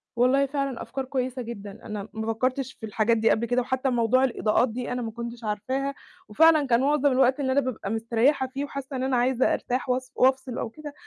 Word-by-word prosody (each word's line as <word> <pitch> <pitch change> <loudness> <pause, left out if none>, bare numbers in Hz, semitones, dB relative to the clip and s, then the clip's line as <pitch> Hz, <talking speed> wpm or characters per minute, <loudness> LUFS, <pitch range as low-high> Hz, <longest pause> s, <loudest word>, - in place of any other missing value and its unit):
والله 260 +3 +3
فعلًا 275 -2 -3
أفكار 260 +3 -5
كويسة 255 -1 -2
جدًا. 205 -4 -7
أنا 210 -1 -5
ما 220 0 -2
فكّرتش 255 +3 -1
في 220 - -9
الحاجات 220 +2 +1
دي 225 +1 +3
قبل 230 +1 +2
كده 245 +2 +1
وحتّى 260 +1 -1
موضوع 245 +2 +2
الإضاءات 235 -1 +2
دي 245 +2 -5
أنا 250 0 -2
ما 225 -1 -4
كنتش 235 +1 -7
عارفاها 260 +7 -2 0.3
وفعلًا 310 +4 +5
كان 235 0 +3
معظم 285 0 +3
الوقت 260 +1 +3
اللي 260 -2 0
أنا 280 - +3
بابقى 230 -6 -4
مستريّحة 235 +5 +1
فيه 275 +2 -4
وحاسّة 275 -1 -7
إن 255 - -2
أنا 260 -2 +1
عايزة 255 +1 +2
أرتاح 250 +1 -2
وأص 255 +1 -1
وأفصل 260 -1 +2
أو 225 - -3
كده، 295 +4 -10
255 Hz, 210 wpm, -26 LUFS, 230-265 Hz, 0.3 s, وفعلًا